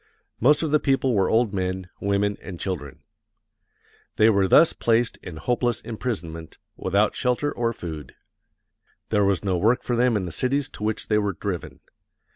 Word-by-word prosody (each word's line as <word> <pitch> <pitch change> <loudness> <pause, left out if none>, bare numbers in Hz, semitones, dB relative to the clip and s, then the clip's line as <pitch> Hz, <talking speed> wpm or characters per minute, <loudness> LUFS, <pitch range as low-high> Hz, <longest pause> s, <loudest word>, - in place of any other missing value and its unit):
Most 150 +7 +4
of 155 - -1
the 150 - +4
people 135 -2 +1
were 95 -3 +2
old 110 -2 +2
men, 95 -1 -2
women, 100 0 0
and 90 -3 -8
children. 75 -8 -5 1.1
They 110 +1 +5
were 100 -2 +2
thus 165 - +6
placed 115 0 +1
in 85 -3 -9
hopeless 120 +3 0
imprisonment, 90 -9 -5 0.2
without 100 +3 +1
shelter 125 +4 0
or 115 -1 -1
food. 80 - -8 0.9
There 105 -2 +2
was 100 -1 +1
no 95 -2 +1
work 115 +7 +2
for 120 - -1
them 120 -1 +3
in 95 - -2
the 85 - -5
cities 135 - -1
to - - -9
which 110 0 -2
they 105 -1 +2
were 100 -1 -1
driven. 90 -1 -5
105 Hz, 170 wpm, -24 LUFS, 95-120 Hz, 1.1 s, thus